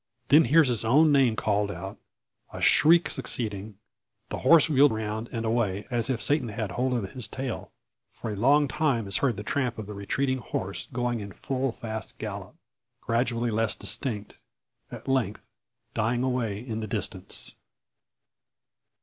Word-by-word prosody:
Then 150 +3 +7
hears 155 +4 +5
his 120 -3 +2
own 150 +7 +5
name 135 -5 +4
called 105 -1 0
out, 95 +1 -7 0.5
a - - -7
shriek 170 +2 +6
succeeding; 110 -5 -2 0.5
the - - -4
horse 165 -2 +6
wheeled 145 -2 +5
round, 110 +1 -4
and 115 -2 -3
away, 110 -4 0
as 120 -1 +1
if 125 -3 0
Satan 145 -5 +1
had 105 -2 -4
hold 125 +6 0
of 100 -6 -3
his 125 -4 -3
tail! 130 +2 -5 0.4
For 115 - -6
a - - -4
long 140 +7 +4
time 135 -7 0
is 100 - +2
heard 130 -6 +1
the 105 - -5
tramp 125 0 -1
of 110 - -5
the 105 - -8
retreating 130 +7 -1
horse 100 -3 -4
going 120 -1 -1
in 100 -1 -7
full 135 +6 -2
fast 110 -1 -7
gallop - - -7 0.4
gradually 120 0 0
less 110 0 +1
distinct 110 -1 -4 0.5
at - - -10
length 130 -6 -1 0.5
dying 120 +3 0
away 125 -6 -1
in 115 -1 -5
the 110 - -4
distance. 100 -3 -3
115 Hz, 160 wpm, -27 LUFS, 105-130 Hz, 0.5 s, Then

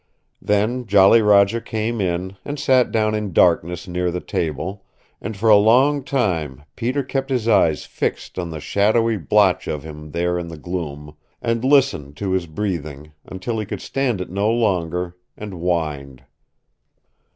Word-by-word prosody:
Then 110 +4 0
Jolly 100 +3 +6
Roger 105 +2 +4
came 110 +1 -3
in, 90 +1 -2
and 145 +1 -5
sat 130 -3 +3
down 110 -1 +1
in 105 -3 -3
darkness 85 +1 +2
near 90 0 -1
the 90 +1 -3
table, 90 +5 -4 0.4
and 110 -3 -5
for 110 +3 -1
a 110 - +8
long 130 +7 +4
time 85 - -1
Peter 130 +4 -1
kept 135 +1 -3
his 125 -4 -1
eyes 85 -9 +3
fixed - - -4
on 85 -2 -3
the 80 -1 -6
shadowy 110 +7 +1
blotch 80 -8 +2
of 75 -2 -3
him 75 -1 -9
there 90 +2 -1
in 85 - -6
the 80 -1 -8
gloom, 75 -3 -6 0.2
and 115 0 -1
listened 130 - +2
to 95 +2 -3
his 95 -2 0
breathing, 75 -5 -4
until 100 +5 -4
he 110 - -3
could - - -5
stand 130 -7 -1
it 90 - -6
no 100 +3 0
longer, 90 -6 -1 0.2
and 105 -2 -7
whined. 80 -7 -3
95 Hz, 165 wpm, -21 LUFS, 85-115 Hz, 0.4 s, a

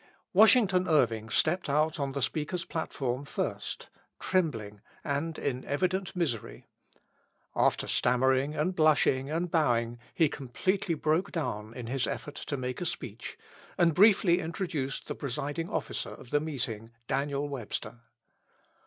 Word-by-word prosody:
Washington 195 -3 +6
Irving 115 -8 +2
stepped 175 +8 +1
out 155 +2 +2
on 140 -1 -1
the 140 -2 -1
speaker's 165 +5 -1
platform 135 -6 -3
first, 140 - -4 0.3
trembling, 115 - -1 0.2
and 145 +3 -2
in 130 -2 -2
evident 185 +6 -1
misery. 145 - -2 0.9
After - - +2
stammering 130 +4 +2
and 165 +5 0
blushing 145 -4 +3
and 165 +2 -1
bowing, 120 -7 +1 0.2
he 160 - +5
completely 165 +7 -1
broke 155 +4 +1
down 110 - -3
in 125 - -6
his 130 +2 -1
effort 145 - -4
to 145 - -4
make 125 +2 -4
a - - -1
speech, 115 -6 -6 0.4
and 170 -2 +4
briefly 190 -1 +5
introduced 160 -5 -3
the - - -2
presiding 145 +4 -3
officer - - -3
of 120 - -12
the 145 - +4
meeting, 120 -8 -4 0.2
Daniel 140 +1 -1
Webster. 125 -3 -5
145 Hz, 135 wpm, -30 LUFS, 125-165 Hz, 0.9 s, Washington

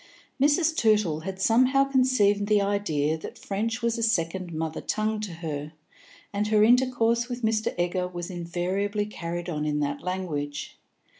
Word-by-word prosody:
Mrs. 305 +3 +3
Tootle 210 - +2
had 190 +3 -6
somehow 255 +6 +4
conceived 255 -7 +2
the 210 -1 +4
idea 160 -7 0
that - - -8
French 225 +4 -3
was 235 0 0
a - - -2
second 185 -4 0
mother 160 0 -3
tongue 215 0 -1
to 210 -3 -4
her, 155 -2 -5 0.6
and 205 +1 0
her 210 -1 +4
intercourse 240 0 +3
with 245 -1 -5
Mr. 220 0 +1
Egger 180 +1 0
was 175 0 -6
invariably 185 +4 -2
carried 175 -4 -5
on 150 -4 -2
in 150 -1 0
that 145 0 -2
language. 155 -6 -4
200 Hz, 155 wpm, -26 LUFS, 170-225 Hz, 0.6 s, somehow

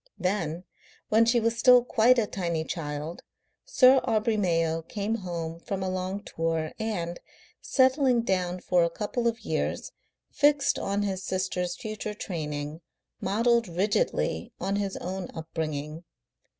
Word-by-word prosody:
Then, 180 -3 -1 0.5
when 225 +1 +5
she 235 0 +4
was 230 0 0
still 250 0 +7
quite 245 +1 +4
a 230 - +3
tiny 170 -5 -2
child, 155 -1 -5 0.4
Sir 265 - +6
Aubrey 225 -2 +1
Mayo 165 -5 +1
came 205 +6 -3
home 170 -4 -5
from 190 +2 -4
a 185 - -1
long 185 +2 -3
tour, 165 -3 -2
and, 175 -6 -3 0.4
settling 260 -2 +3
down 185 -4 -1
for 180 -1 +3
a 170 - +2
couple 220 +6 -2
of 230 0 -1
years, - - -2 0.4
fixed 290 -1 +3
on 200 +1 -1
his 190 -2 -2
sister's 185 -2 -2
future 215 +2 -5
training, 150 -4 -4 0.4
modelled 230 +3 +2
rigidly 200 - 0
on 195 +1 -1
his 200 -1 -2
own 185 0 -5
upbringing. 160 -1 -4
190 Hz, 135 wpm, -27 LUFS, 170-225 Hz, 0.5 s, still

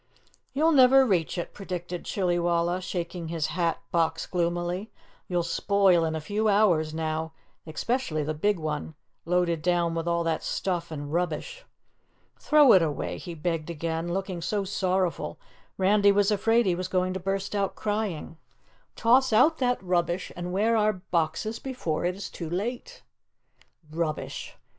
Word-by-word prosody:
"You'll 315 +4 +3
never 265 -2 +7
reach 180 -7 0
it," 175 - -4
predicted 180 -2 -6
Chillywalla, 175 -1 0
shaking 175 -2 -4
his 160 -2 -2
hat 170 -2 0
box 165 -1 +1
gloomily. 175 +3 -2 0.4
"You'll 175 -1 0
spoil 190 0 +3
in 160 0 -2
a - - -2
few 210 +7 -1
hours 180 -7 +3
now, 160 0 -3 0.3
especially 160 - -1
the 155 +2 -2
big 205 +6 +1
one, 155 0 -4 0.3
loaded 170 -1 +1
down 175 0 +1
with 165 0 -3
all 170 0 +1
that 165 -1 -1
stuff 180 -3 -2
and 145 -2 -6
rubbish. 180 - -2 0.7
Throw 300 -4 +6
it 190 - +7
away," 155 -3 -2
he 175 -2 -7
begged 165 0 -2
again, 165 +1 -3
looking 185 -1 -3
so 200 +4 -1
sorrowful 185 -2 -1 0.4
Randy 200 +1 +4
was 200 +1 +3
afraid 225 +3 +3
he 185 - +2
was 180 +1 -3
going 185 0 0
to 190 - -3
burst 195 +2 -2
out 200 -1 -1
crying. 205 -7 -3 0.6
"Toss 255 +2 +4
out 280 +9 +4
that 250 -5 0
rubbish 175 0 0
and 175 0 -5
wear 215 +5 +2
our 215 -1 +3
boxes 180 +3 -2
before 210 -12 -3
it 180 +1 0
is 200 - -6
too 165 -3 -6
late!" 240 - -4 0.9
"Rubbish!" 160 -1 -4
180 Hz, 155 wpm, -27 LUFS, 165-205 Hz, 0.9 s, never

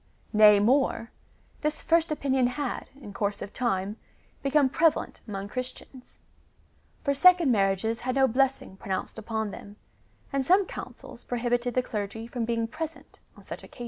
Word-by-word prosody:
Nay 210 -1 +7
more, 235 +1 +2 0.5
this 300 0 -1
first 330 -1 +2
opinion 265 -4 +1
had, 255 +1 -4
in 205 -7 -10
course 200 0 -2
of 200 - -7
time, 205 -3 -1 0.4
become 275 0 +3
prevalent 320 +4 +1
among 200 -1 -5
Christians; 255 +2 -8 0.9
for 280 - +2
second 350 -1 +6
marriages 205 +2 +1
had 255 +1 -2
no 270 -1 +5
blessing 265 -5 0
pronounced 190 +3 -4
upon 220 -1 -3
them, 200 +1 -10 0.6
and 275 -1 +1
some 375 +8 +4
Councils - - -9
prohibit 245 0 -1
ed 245 - -2
the 255 - +2
clergy 215 0 -4
from 235 0 -3
being 230 0 -1
present 320 +5 -7 0.2
on - - -15
such - - -7
occasions. - - -15
245 Hz, 155 wpm, -27 LUFS, 215-275 Hz, 0.9 s, Nay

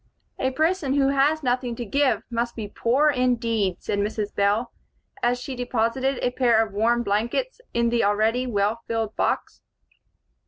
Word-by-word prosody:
"A 260 - +1
person 310 0 0
who 275 -1 +3
has 285 +3 +2
nothing 245 -1 0
to 240 - -5
give 255 -2 +1
must 235 0 -2
be 220 -2 -5
poor, 260 +8 +2
indeed," 230 -7 0
said 205 - -1
Mrs. 210 0 -2
Bell, 205 +4 +1 0.5
as 245 +1 +1
she 260 +1 -6
deposited 245 +2 0
a 250 - +1
pair 235 -3 +3
of 205 - -13
warm 235 +3 +2
blankets 235 - -1
in 235 0 +1
the 235 0 +1
already 220 +5 +1
well 210 0 0
filled 225 -2 -2
box. - - -1
235 Hz, 160 wpm, -24 LUFS, 220-260 Hz, 0.5 s, who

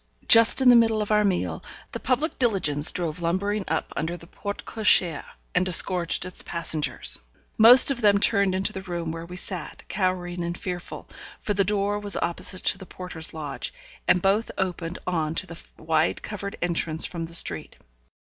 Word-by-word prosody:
Just 230 +3 +7
in 255 - +6
the 245 - +7
middle 225 -2 +3
of 210 - -6
our 210 0 +3
meal, 190 -3 -2 0.3
the - - -6
public 275 +6 -2
diligence 180 - +1
drove 170 -1 -4
lumbering 200 +5 -2
up - - -3
under 170 +2 -3
the 170 - -13
porte 200 +4 -8
cochère, 185 -8 +2 0.3
and 180 - +2
disgorged 180 -1 +1
its 185 - +2
passengers. 160 -3 +1 0.4
Most 245 +5 +8
of 250 -3 -3
them 205 -2 +4
turned 200 -2 +2
into 190 +1 0
the 190 - -6
room 175 -3 -5
where 165 +1 -8
we 180 - -10
sat, 180 0 -7
cowering 180 -2 -2
and 170 +1 -5
fearful, 180 -1 -7 0.3
for 210 - -3
the 200 0 +1
door 205 +1 -1
was 205 -1 0
opposite 175 +2 -3
to 190 - +4
the 190 - -11
porter's 180 -3 -5
lodge, 150 -3 -6 0.4
and 180 - +2
both 200 +4 +1
opened 180 -2 -4
on 160 -3 -2
to - - -1
the 170 -2 -11 0.2
wide 160 0 -1
covered 200 -1 -7
entrance 165 -2 0
from 170 -2 -5
the 165 +1 -7
street. - - +2
185 Hz, 180 wpm, -24 LUFS, 170-205 Hz, 0.4 s, Most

